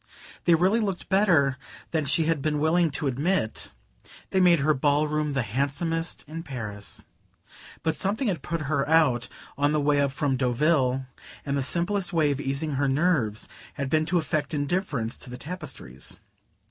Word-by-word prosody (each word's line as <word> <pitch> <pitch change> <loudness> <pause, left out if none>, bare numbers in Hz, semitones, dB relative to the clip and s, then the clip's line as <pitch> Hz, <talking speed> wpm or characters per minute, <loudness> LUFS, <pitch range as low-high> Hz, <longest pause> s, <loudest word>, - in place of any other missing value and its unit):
They 170 - +6
really 185 +7 +3
looked 195 -5 -3
better 160 -10 +3 0.3
than 160 -3 0
she 155 +4 +2
had 160 -3 +1
been 150 +1 0
willing 160 +3 +3
to 150 +1 -3
admit: 140 0 0 0.6
they 190 - +2
made 175 -4 +5
her 155 +2 +3
ballroom 150 +1 +1
the 135 -3 +1
handsomest 145 +8 -2
in 160 +2 -6
Paris. 110 - -6 0.8
But 160 - +1
something 215 +6 0
had 175 -8 -1
put 165 +3 -3
her 145 0 0
out 150 -7 +4 0.3
on 145 +1 +3
the 155 - +2
way 145 0 +3
up 140 -1 +1
from 135 -1 0
Deauville, 130 0 +2 0.4
and 140 -1 -1
the 140 - +1
simplest 180 +6 0
way 155 -3 +3
of 140 0 -2
easing 140 +1 -2
her 140 - +3
nerves 135 -7 +1 0.3
had 140 -1 -3
been 155 0 +2
to 180 - +2
affect 155 -2 -1
indifference 145 - -1
to - - -11
the 125 - -7
tapestries. 140 - -6
150 Hz, 170 wpm, -26 LUFS, 135-165 Hz, 0.8 s, They